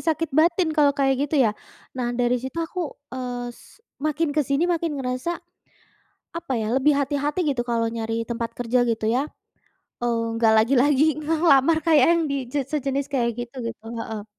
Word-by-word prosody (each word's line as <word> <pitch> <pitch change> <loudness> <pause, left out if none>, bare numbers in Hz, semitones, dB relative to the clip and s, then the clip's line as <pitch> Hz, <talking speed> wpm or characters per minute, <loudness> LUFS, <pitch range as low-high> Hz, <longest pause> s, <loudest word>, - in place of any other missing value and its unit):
sakit 320 0 0
batin 340 +2 +3
kalau 290 -2 +5
kayak 270 -1 +3
gitu 310 - 0
ya. - - +4 0.5
Nah, 245 -2 -1
dari 245 0 +2
situ 260 +6 -7
aku, 365 - -9 0.3
eee, 250 -1 -4
s - - -18 0.4
makin 310 +2 0
ke - - +5
sini 280 +4 +2
makin 335 -2 0
ngerasa 255 +3 -2 1.1
apa 335 -6 -4
ya, - - -2
lebih 280 +3 +4
hati-hati 285 +3 -1
gitu 255 -3 -1
kalau 230 -1 +1
nyari 225 0 -2
tempat 230 -1 -3
kerja, 245 +1 +1
gitu 225 -1 -1
ya. 260 - +2 0.8
Eee, 235 -1 0
nggak 230 -1 +3
lagi-lagi 265 +5 +4 0.2
ngelamar 315 -1 +4
kayak 310 -5 +5
yang 340 0 +3
di - - 0 0.2
je 290 - 0
sejenis 275 -1 -1
kayak 240 -3 +2
gitu, 240 +2 -6
gitu. 230 - -11 0.2
Heeh. 220 -2 -5
270 Hz, 170 wpm, -24 LUFS, 240-305 Hz, 1.1 s, kalau